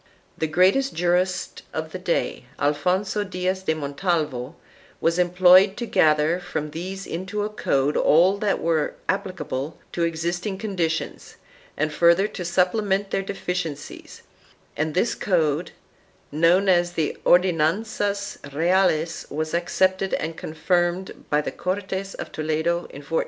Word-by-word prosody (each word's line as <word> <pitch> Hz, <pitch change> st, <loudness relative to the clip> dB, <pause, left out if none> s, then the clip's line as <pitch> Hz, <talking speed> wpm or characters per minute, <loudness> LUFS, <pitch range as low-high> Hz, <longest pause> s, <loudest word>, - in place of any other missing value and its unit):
The 160 Hz, -, -1 dB
greatest 190 Hz, -, +3 dB
jurist 180 Hz, +2 st, 0 dB
of 160 Hz, 0 st, -3 dB
the 185 Hz, -, -6 dB
day, 170 Hz, -7 st, -1 dB
Alfonso 180 Hz, +8 st, 0 dB
Diaz 185 Hz, -1 st, -2 dB
de 160 Hz, -4 st, 0 dB
Montalvo, 150 Hz, -2 st, -2 dB, 0.4 s
was 170 Hz, +2 st, +1 dB
employed 185 Hz, +2 st, +5 dB
to 240 Hz, -, -3 dB
gather 155 Hz, -3 st, +3 dB
from 150 Hz, -4 st, -4 dB
these 185 Hz, +4 st, -6 dB
into 185 Hz, +5 st, -3 dB
a 210 Hz, -, -2 dB
code 145 Hz, -8 st, 0 dB
all 180 Hz, +6 st, +4 dB
that 205 Hz, -1 st, 0 dB
were 160 Hz, -2 st, 0 dB
applicable 160 Hz, -7 st, -3 dB
to 170 Hz, -, -1 dB
ex 165 Hz, -1 st, -1 dB
isting 180 Hz, +3 st, -2 dB
conditions 175 Hz, -6 st, -3 dB, 0.4 s
and 155 Hz, 0 st, -1 dB
further 170 Hz, +5 st, +4 dB
to 180 Hz, -, -6 dB
supplement 190 Hz, +3 st, +1 dB
their -, -, +1 dB
deficiencies, 180 Hz, -6 st, -5 dB, 0.5 s
and 155 Hz, 0 st, -2 dB
this 220 Hz, +6 st, +2 dB
code, 165 Hz, -3 st, 0 dB, 0.6 s
known 170 Hz, +6 st, +3 dB
as 175 Hz, -1 st, +3 dB
the 160 Hz, -3 st, -1 dB
Ordenanzas 200 Hz, +4 st, +1 dB
Reales, 165 Hz, +1 st, +1 dB
was 155 Hz, +2 st, -3 dB
accepted 185 Hz, +2 st, +1 dB
and 160 Hz, +1 st, -4 dB
confirmed 175 Hz, +3 st, -1 dB
by 150 Hz, 0 st, +2 dB
the -, -, -4 dB
Cortes 190 Hz, +1 st, -3 dB
of -, -, -7 dB
Toledo 160 Hz, +3 st, -1 dB
in 140 Hz, -, -10 dB
1480. 165 Hz, +3 st, -2 dB
175 Hz, 135 wpm, -24 LUFS, 160-190 Hz, 0.6 s, employed